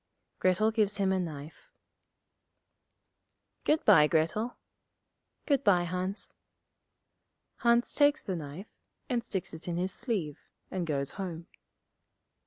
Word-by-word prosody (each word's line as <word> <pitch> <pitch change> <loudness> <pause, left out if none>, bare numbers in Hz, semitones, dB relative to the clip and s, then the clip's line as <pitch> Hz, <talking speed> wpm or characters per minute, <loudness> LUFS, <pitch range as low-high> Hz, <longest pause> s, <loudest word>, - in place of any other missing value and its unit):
Grettel 185 +4 +3
gives 210 -2 +1
him 195 -2 +2
a 190 - +2
knife. 160 - -7 1.9
'Good 310 +1 +2
bye, 160 -8 +7
Grettel.' 165 +10 0 0.9
'Good 280 -2 +2
bye, 180 -4 +4
Hans.' 180 +3 -3 1.2
Hans 235 0 +3
takes 290 0 +4
the 190 - -2
knife, 160 +5 -8 0.4
and 240 -3 0
sticks 190 -8 -4
it 160 +2 -9
in 170 -1 -2
his 185 +2 -1
sleeve, 195 - -3 0.3
and 180 -3 -2
goes 140 -2 -1
home. 175 -4 -5
185 Hz, 115 wpm, -30 LUFS, 165-220 Hz, 1.9 s, bye